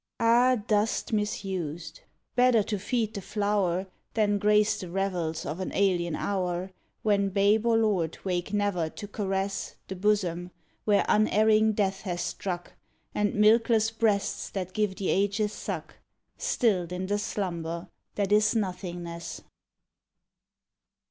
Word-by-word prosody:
Ah! 240 +3 +5
dust 215 +1 0
misused! 180 -7 -3 0.4
better 245 -3 +5
to 205 0 -3
feed 220 +1 -1
the 200 - -5
flow 205 0 0
r, 180 +2 -1 0.3
Than 205 -2 +2
grace 210 +1 +3
the 180 - -6
revels 175 -4 -2
of 150 +5 -4
an 185 - -3
alien 175 -4 +2
hour, 185 -1 -2 0.3
When 200 -2 +2
babe 205 +3 +3
or 230 -1 +4
lord 195 -8 +1
wake 180 0 -2
never 200 -6 0
to 205 - -8
caress 195 -1 -2
The 190 - -4
bosom 180 -3 0 0.4
where 205 -2 +3
unerring 215 +1 +4
Death 195 -2 0
hath 175 -3 -3
struck 175 -2 -4 0.4
And 210 -1 0
milkless 225 +1 +4
breasts 220 -3 0
that 185 -2 -4
give 210 -3 0
the 190 - -2
ages 205 +2 +1
suck - - -6 0.4
Stilled 185 -8 +1
in 180 +1 -3
the 205 +2 0
slumber 170 -4 -3 0.3
that 200 -1 -1
is 210 +2 +4
nothingness. 175 -4 -4
200 Hz, 135 wpm, -28 LUFS, 180-210 Hz, 0.4 s, Ah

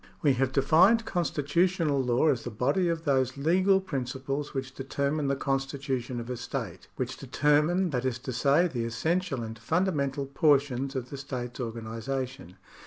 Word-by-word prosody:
We 145 -3 +5
have 130 +1 0
defined 180 - +4
constitutional 165 -2 +1
law 125 +4 +2
as 130 -5 0
the - - -4
body 140 - +1
of 165 -1 -2
those 130 -2 +1
legal 185 +6 +3
principles 135 -3 -4
which 135 -1 -4
determine 140 +2 -1
the 140 - +1
constitution 135 -2 -2
of 120 - -6
a 125 - -3
state - - -5
— - - -38
which 130 0 -3
determine, 150 +7 +2
that 125 -2 -1
is 130 -2 -1
to 130 - -3
say, 140 +8 +3
the 120 -8 -3
essential 150 - -1
and 110 0 -7
fundamental 145 - 0
portions 140 -1 +2
of 125 -1 -4
the 140 - -5
state's 130 -3 -6
organisation. 115 0 -5
135 Hz, 165 wpm, -28 LUFS, 125-155 Hz, -, We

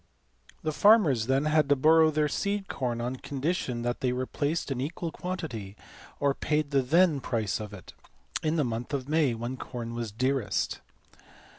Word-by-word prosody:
The 155 - 0
farmers 155 - +5
then 135 +2 +2
had 155 -2 +3
to 145 - +6
borrow 160 +3 +5
their 155 -1 +1
seed 200 +5 -2
corn 120 -3 -2
on 125 +2 -3
condition 140 -2 -2
that 120 0 -1
they 130 -3 0
replaced 145 +5 -2
an 125 -2 -2
equal 160 +4 -3
quantity, 155 - -5 0.4
or 140 -1 +2
paid 150 0 -1
the 140 -1 +3
then 160 +3 +3
price 110 -6 -1
of 105 -1 -6
it, 100 -4 -11 0.5
in 155 +1 0
the 155 - +2
month 120 +4 -3
of 130 -1 -4
May, 150 -5 +2
when 120 +3 -4
corn 120 -2 -6
was 115 -2 -4
dearest. 130 +1 -1
135 Hz, 170 wpm, -28 LUFS, 120-155 Hz, 0.5 s, to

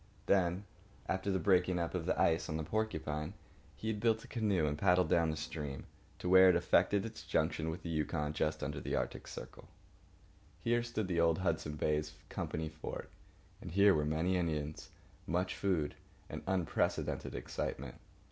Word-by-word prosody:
Then, 90 0 +2 0.4
after 95 +1 -1
the 95 - +2
break 95 -2 +3
up 85 -2 -1
of 90 -2 -2
the - - +1
ice 85 -3 +3
on 80 - -1
the 80 - -2
Porcupine, 75 -6 -2 0.4
he 95 +10 -4
had 105 -1 -1
built 110 0 +2
a - - -12
canoe 105 -8 +1
and 75 -1 0
paddled 90 0 +3
down 85 -1 +3
that 80 - -2
stream 70 -5 -5 0.3
to - - -5
where 95 +1 +8
it 90 - +5
effected 100 +4 +3
its 110 -1 -7
junction 80 - 0
with 85 +4 -5
the 85 - -4
Yukon 75 -1 -1
just 75 0 -1
under - - -3
the - - -2
Artic - - -3
circle. - - -9 0.9
Here 120 +5 +2
stood 115 -4 -2
the 85 -2 0
old 85 -1 +4
Hudson's 75 -5 -1
Bay 75 +1 +2 0.3
Company 80 0 -3
fort; 80 0 -7 0.5
and 90 - -7
here 100 +1 +6
were 75 - +2
many 80 +5 +1
Indians, 75 -3 -2 0.4
much 90 +2 0
food, 90 -7 0 0.4
and - - -5
unprecedented 95 -3 0
excitement. 65 +1 -4
85 Hz, 175 wpm, -34 LUFS, 80-95 Hz, 0.9 s, where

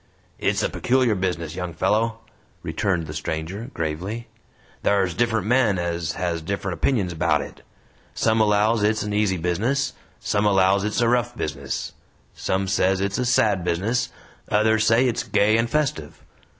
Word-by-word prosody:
"It's - - +1
a - - +1
peculiar 125 -2 +2
business, 90 -5 -2
young 90 -3 -5
fellow," 110 +5 0 0.4
returned 95 -6 -1
the 75 - -7
stranger, 80 - -4
gravely. 90 +9 -4 0.5
"Thar's 95 -3 +2
different 115 +1 0
men 115 -4 +3
ez 85 -1 -2
has 85 -2 -2
different 95 +2 -3
opinions 95 - 0
about 80 -3 +1
it. - - -10 0.5
Some 110 0 +2
allows 105 +1 +3
it's 110 +1 +1
an 105 0 -3
easy 105 -3 +1
business, 115 +12 0 0.3
some 105 0 0
allows 95 0 +3
it's 105 +2 0
a 120 - +3
rough 120 0 +1
business; 70 -3 -4 0.4
some 95 +1 -1
says 95 0 +2
it's 100 +3 -1
a 125 - 0
sad 105 -6 +2
business, 95 +8 0 0.4
others 110 +1 +3
says 115 +3 +4
it's 120 -3 0
gay 105 +2 +2
and 115 +1 +1
festive. 135 - -2
100 Hz, 155 wpm, -23 LUFS, 85-115 Hz, 0.5 s, says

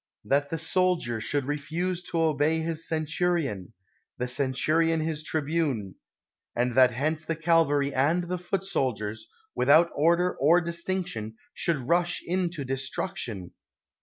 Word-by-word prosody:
— - - -41
that 145 0 +2
the 165 - -2
soldier 165 -8 +1
should 140 +4 -1
refuse 165 +5 -2
to 170 -1 -3
obey 155 0 +2
his 165 0 -3
centurion; 155 - -1 0.5
the 125 - -2
centurion 150 +6 +1
his 155 -1 -2
tribune; 150 - -1 0.6
and 120 +1 0
that 130 0 +6
hence 155 +6 -1
the 165 +1 -2
cavalry 150 -4 +2
and 155 +7 +2
the 180 +1 -3
foot 185 +1 -2
soldiers, 110 - -2 0.3
without 155 +6 +5
order 170 +4 +2
or 160 +6 +5
distinc 175 +2 -2
tion, 110 -9 -6 0.2
should 170 -3 0
rush 175 +2 +2
into 175 -4 -1
destruction 130 - -4
155 Hz, 135 wpm, -27 LUFS, 135-170 Hz, 0.6 s, that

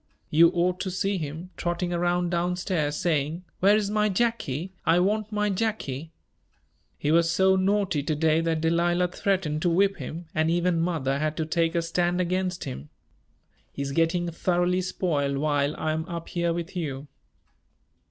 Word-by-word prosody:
You 165 +2 +7
ought 180 +1 +1
to 190 - -2
see 195 +1 -1
him, 160 +4 -6
trotting 175 +1 -2
around 175 0 0
down 175 +1 0
stairs, 165 -5 -1
saying: 165 0 -1
'Where 200 +3 +5
is 210 -1 0
my 210 0 +2
Jacky? 190 - -1
I 165 +2 +4
want 210 +3 0
my 210 -1 0
Jacky.' 180 - -2 0.9
He 150 - 0
was 165 +1 +4
so 190 +2 +4
naughty 190 -4 +1
to 150 +2 -1
day 160 +1 +2
that 165 -1 0
Delilah 175 +2 +2
threatened 180 -5 -1
to 175 - +2
whip 195 +3 +2
him, 160 +4 -6
and 155 +1 +1
even 175 0 +1
mother 145 -6 0
had 155 0 -1
to 160 - -1
take 165 +1 0
a 170 - +1
stand 175 +1 0
against 180 0 -1
him. 65 +3 -7 0.8
He 140 - -4
is 140 - -3
getting 165 +3 +1
thoroughly 175 +2 +1
spoiled 150 -7 -1
while 145 0 +1
I 155 - -1
am 160 +2 -2
up 170 -1 -5
here 170 -1 0
with 170 +2 -4
you." 145 -5 -4
170 Hz, 170 wpm, -26 LUFS, 155-185 Hz, 0.9 s, You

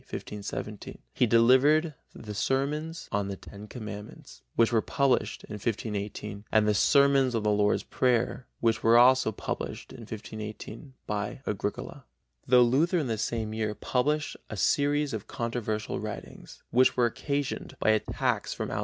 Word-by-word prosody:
1517) 105 0 -6 0.2
he 125 - +2
delivered 130 +8 +5 0.2
the 105 -2 -8
Sermons 150 +8 -1
on 100 -1 0
the 100 - -4
Ten 100 +2 -11
Commandments, 105 -3 -9
which 115 0 +4
were 110 - +4
published 125 -5 0
in - - -9
1518 105 -1 -4
and 110 -1 +4
the 105 - +4
Sermons 135 +3 +4
on 110 - 0
the 105 - +2
Lord's 105 0 +2
Prayer, 125 0 0
which 115 -1 +2
were 115 +1 +5
also 125 -1 +6
published - - -5
in 130 - -11
1518 110 +3 -8
by 105 +5 -3
Agricola. 105 0 -4 0.4
Though 125 0 +7
Luther 145 +9 +3
in 155 - 0
the 115 -3 -2
same 110 -1 -2
year 110 -1 -2
published 145 +8 0
a 110 - -6
series 145 +5 +2
of 110 -1 -5
controversial 115 -2 -3
writings, - - -8
which 130 +2 +4
were 120 - +4
occasioned 140 +4 -3
by 110 - +3
attacks 110 - 0
from - - -4
outside - - -3
sources, - - -2
viz. - - -1
115 Hz, 160 wpm, -28 LUFS, 105-130 Hz, 0.4 s, Though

